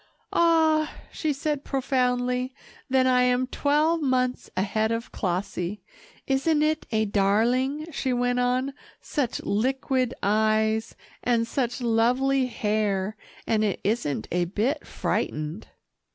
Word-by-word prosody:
"Ah!" 320 -2 +3 0.2
she 310 - -1
said 290 0 -2
profoundly, 250 -1 0 0.3
"then 260 0 +3
I 250 -1 +4
am 250 0 +3
twelve 300 +5 +1
months 255 -2 0
ahead 215 +3 +1
of 230 +1 -3
Clossie. 185 0 -3 0.4
Isn't 295 +3 +2
it 310 0 0
a 220 -1 +2
darling," 235 +9 +1
she 270 -3 -2
went 245 0 +1
on, 255 +2 +1 0.3
"such 275 -6 -2
liquid 255 +3 0
eyes, 220 +1 +1 0.3
and 235 -2 +2
such 245 +1 -2
lovely 250 +3 +2
hair, 210 -3 -1 0.3
and 215 -1 +1
it 205 -3 0
isn't 195 - -1
a 175 0 +1
bit 215 - -1
frightened." 155 +6 -2
250 Hz, 120 wpm, -26 LUFS, 215-270 Hz, 0.4 s, I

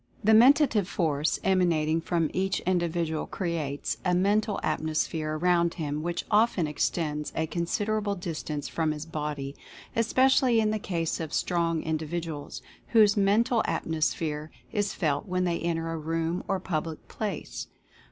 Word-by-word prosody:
The 220 +2 +5
Mentative 240 - +5
Force 155 -5 0
emanating 165 -4 +2
from 165 -2 0
each 190 +1 0
indi 175 -2 +1
vidual 160 -2 -2
creates 145 - -2
a 180 - +2
Mental 205 +2 +2
Atmosphere 155 0 -1
around 170 0 +2
him 150 -3 -3
which 170 +1 -3
often 210 -5 +3
extends 150 0 -1
a 160 - 0
considerable 205 +5 -1
distance 155 -5 -4
from 160 -2 0
his 150 +1 -6
body, 150 -3 -4 0.4
especially 255 +1 +4
in 215 -1 +2
the 215 - -1
case 170 -5 -2
of 160 -2 -4
strong 170 -2 0
individuals, 160 -1 -4 0.3
whose 215 -3 +6
Mental 220 +4 +3
Atmosphere 155 -1 -1 0.2
is 205 -3 -1
felt 145 -5 0
when 185 0 0
they 175 -2 0
enter 165 -1 -1
a 165 - -3
room 165 +2 -2
or 195 - 0
public 160 -3 -4
place. 205 -7 -5
170 Hz, 140 wpm, -28 LUFS, 155-195 Hz, 0.4 s, whose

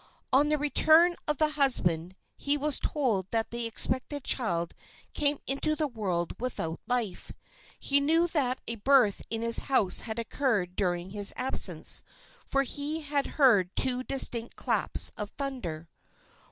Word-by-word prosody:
On 285 +3 +3
the 300 - +1
return 315 +4 +4
of 300 -1 -1
the 310 +1 +2
husband 185 - +1 0.2
he 285 +1 -2
was 295 -1 -1
told 225 - -2
that 225 -1 -1
the 235 0 -3
expected 255 +4 +3
child 170 -12 -1 0.4
came 290 -1 0
into 310 +3 0
the 305 -1 -1
world 190 - -4
without 165 -10 -4
life. 235 -6 -3 0.5
He 280 0 +1
knew 325 +4 +2
that 265 -6 -1
a 230 - -3
birth 245 -2 +2
in 225 0 -3
his 230 0 +8
house 210 -9 +4
had 220 -1 -4
occurred 225 -6 -2
during 180 -1 -3
his 205 0 +2
absence, 260 +1 +1 0.4
for 275 0 0
he 290 +4 -3
had 290 -2 -2
heard 205 - +3
two 255 -1 0
distinct 245 -3 +2
claps - - -1
of 210 -1 -5
thunder. 195 - -5
255 Hz, 150 wpm, -27 LUFS, 205-285 Hz, 0.5 s, his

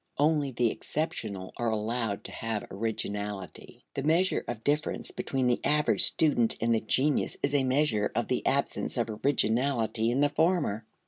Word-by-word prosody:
Only 150 -1 +2
the 120 -2 +1
exceptional 110 - -4
are 120 -1 0
allowed 110 -1 -1
to - - -7
have 115 -2 -3
originality. 105 -2 -5
The 135 - -3
measure 165 +6 +2
of 115 -2 -5
difference 150 +2 -1
between 135 -2 -2
the 125 -1 +1
average 150 0 +3
student 130 -8 +3
and 115 +1 +2
the 115 - +1
genius 135 +6 +1
is 140 - +1
a 140 -2 +3
measure 130 -5 +1
of 115 - 0
the 125 - -1
absence 140 0 0
of 115 -2 0
originality 115 -1 +1
in 125 +4 +1
the 145 - +4
former. 150 - 0
120 Hz, 160 wpm, -29 LUFS, 110-145 Hz, -, the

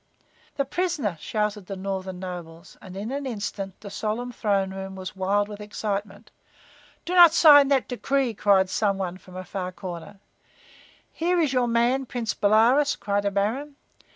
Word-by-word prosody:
"The 275 - 0
prisoner!" 290 - -1
shouted 210 -1 -2
the 195 - -5
northern 190 -1 -4
nobles, 175 -1 -8
and 190 0 -10
in 210 +5 -4
an 280 0 -3
instant 200 -4 -5
the 200 -1 -9
solemn 220 +4 -3
throne 200 -5 0
room 190 0 -6
was 185 +1 -7
wild 200 +2 +1
with 210 0 -9
excitement. 205 0 -5 0.7
"Do 355 - -3
not 345 -3 +8
sign 290 -4 +8
that 275 -2 +2
decree!" 265 0 -1
cried 195 -2 +3
some 200 +1 0
one 185 -1 -4
from 185 -1 -15
a 185 - -5
far 185 -1 -4
corner. 180 +1 -8 0.9
"Here 350 +2 +1
is 300 -5 +1
your 250 -1 +2
man, 240 +3 +1
Prince 230 -4 -3
Bolaroz!" 230 +8 +3
cried 205 0 -2
a - - +3
baron. 225 +9 -2
205 Hz, 165 wpm, -25 LUFS, 190-255 Hz, 0.9 s, not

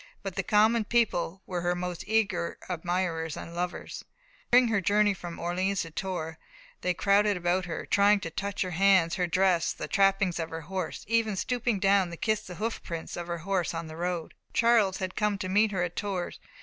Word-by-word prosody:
But 195 -2 -5
the 195 - 0
common 215 +4 +3
people 200 -5 0
were 180 -2 -3
her 175 +1 0
most 180 -1 -4
eager 195 -6 0
admirers 175 -2 -2
and 170 - -8
lovers. 175 +1 -4 0.5
During 245 0 +6
her 210 -3 +2
journey 205 +2 +3
from 175 -2 -8
Orleans 185 +3 -1
to 165 - -9
Tours, 165 -3 -4 0.4
they 180 -1 0
crowded 205 +1 +3
about 180 +1 0
her, 165 -2 -5
trying 205 +1 +4
to 165 - -5
touch 200 +4 -2
her 185 - -4
hands, 185 -1 +4
her 180 -2 0
dress, 180 -1 +2
the - - -6
trappings 195 -2 +2
of 165 -1 -3
her 165 0 -5
horse 185 +1 -5
even 225 -2 +1
stooping 240 +1 0
down 195 -1 +3
to 170 - -8
kiss 215 +2 0
the 185 -4 -9
hoof 220 +5 -3
prints 165 -1 -6
of 175 -1 -5
her 170 0 -3
horse 190 -4 0
on 165 0 -4
the 155 0 -9
road. 175 -1 -3 0.2
Charles 230 -5 +3 0.2
came 210 -1 +1
to 185 - -4
meet 205 +3 +3
her 185 -3 0
at 175 -1 -4
Tours. 195 -4 -3
185 Hz, 200 wpm, -28 LUFS, 175-205 Hz, 0.5 s, During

